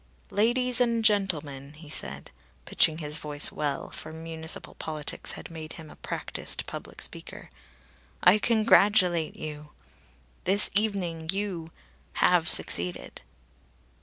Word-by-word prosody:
"Ladies 245 +3 +2
and 230 -2 +2
gentlemen," 150 -10 +1
he 155 0 -13
said, 145 - -5 0.3
pitching 160 -1 +3
his 150 -1 -2
voice 150 -1 +1
well, 145 -2 -3
for 155 - -8
municipal 160 0 -4
politics 155 -2 -4
had - - -9
made 160 -1 -8
him 160 -2 -11
a - - -13
practised - - -3
public - - -8
speaker, - - -8 0.7
"I 190 +4 +7
congratulate 205 -7 +4
you. 150 -1 -8 0.7
This 195 +3 +5
evening 180 -6 -1
you 190 -5 -3 0.4
have - - +3
succeeded!" 90 +1 +1
165 Hz, 115 wpm, -27 LUFS, 150-205 Hz, 0.7 s, I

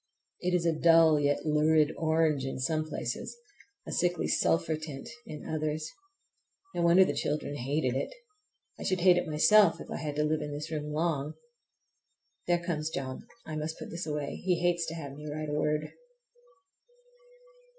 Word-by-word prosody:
It 180 0 0
is 170 -1 +1
a 165 - +3
dull 165 -1 +5
yet 145 +1 +1
lurid 155 0 +3
orange 160 -3 +1
in 135 - -3
some 155 +4 -1
places, - - -4 0.5
a - - -7
sickly 175 -1 +1
sulphur 160 -1 +2
tint 155 -3 -7 0.2
in 150 - -8
others. 155 0 -2 0.9
No - - -1
wonder 170 +2 +6
the 145 - -1
children 145 0 -2
hated 135 0 -1
it! 135 - -2 0.7
I - - -5
should 185 -2 0
hate 180 0 +6
it 180 - -1
myself 160 +7 +5
if - - -9
I - - -3
had 150 -2 -4
to 150 - +1
live 155 0 0
in 150 - -4
this 150 +2 -6
room 150 -1 -3
long. 155 -2 -1 1.1
There 175 0 +4
comes 155 -3 -1
John, 130 -3 -5 0.2
and 155 - -6
I - - -3
must 155 +1 -4
put - - -8
this 170 +1 -5
away,—he 150 +4 -1
hates 175 -1 +1
to 165 - -4
have 145 -4 -7
me 150 +2 -9
write 155 0 -4
a - - -3
word. 150 +1 0
155 Hz, 175 wpm, -30 LUFS, 150-165 Hz, 1.1 s, wonder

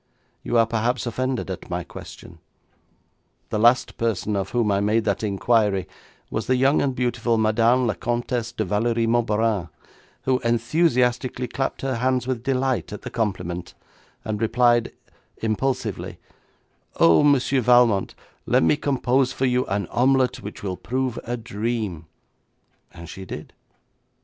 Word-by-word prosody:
You 120 - 0
are 115 - +5
perhaps 120 +3 -1
offended 130 -2 -2
at 90 - -7
my 90 0 -2
question. - - -11 1.1
The 105 - -1
last 120 +3 +3
person 110 -2 -1
of 95 -1 -2
whom 115 -4 +1
I 100 - +2
made 105 +3 +1
that 100 -2 0
inquiry 105 -2 +1 0.4
was 110 - -3
the 130 - +3
young 135 +3 +3
and 135 -2 0
beautiful 120 -2 0
Madame 115 +3 +3
la 110 - +1
Comtesse 120 0 -2
de 110 - -2
Valérie 115 +4 0
Moberanne, 110 -5 +1 0.5
who 130 -1 +1
enthusiastically 125 0 +1
clapped 135 +3 -3
her 130 -3 -1
hands 130 +1 0
with 130 -2 -2
delight 130 -6 -1
at - - -8
the - - -6
compliment, 90 -5 -3 0.5
and 110 -1 -3
replied 120 +1 +3 0.5
impulsively, 115 0 -2 0.8
'"Oh, 85 -1 +5
Monsieur 140 -2 +3
Valmont, 120 -4 +4 0.3
let - - +3
me 115 - +3
compose 130 -2 +1
for 135 0 -1
you 125 0 +1
an 100 0 -1
omelette 130 +1 +2
which 105 - -9
will 95 -2 -3
prove 130 0 -2
a 120 +1 -3
dream," 110 -7 -3 0.8
and 85 0 -11
she 95 +4 -8
did. 95 - -8
115 Hz, 145 wpm, -23 LUFS, 105-125 Hz, 1.1 s, are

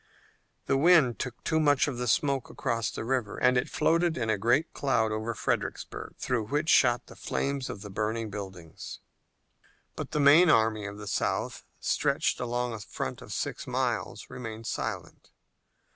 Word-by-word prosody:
The 135 - +2
wind 155 -7 +5
took 125 -2 -3 0.2
much 145 -3 +4
of 130 -4 -3
the 125 - -2
smoke 140 +2 +1
across 115 -2 -1
the - - -5
river 125 -4 -1
and 125 0 +4
it 125 +1 +1
floated 170 0 +2
in 115 -3 0
a 110 - +1
great 120 - +2
cloud 115 -6 +1
over 110 +2 -2
Fredericksburg, - - -3
through 120 -5 -1
which 150 +5 0
shot 120 -5 +4
the - - -13
flames 140 -1 -2
of 100 - -6
the 105 - -8
burning 110 +2 -2
buildings. 95 -5 -8 1.0
But - - -5
the 150 - -1
main 150 +5 +7
army 110 -5 +3
of 100 0 -7
the 105 - -8
South, 100 - -2
stretched - - +1
along 120 0 -1
a 110 - -5
front 100 - -5
of - - -10
six - - -3
miles, - - -2
remained 115 -2 -7
silent. - - -5
120 Hz, 165 wpm, -28 LUFS, 110-140 Hz, 1.0 s, main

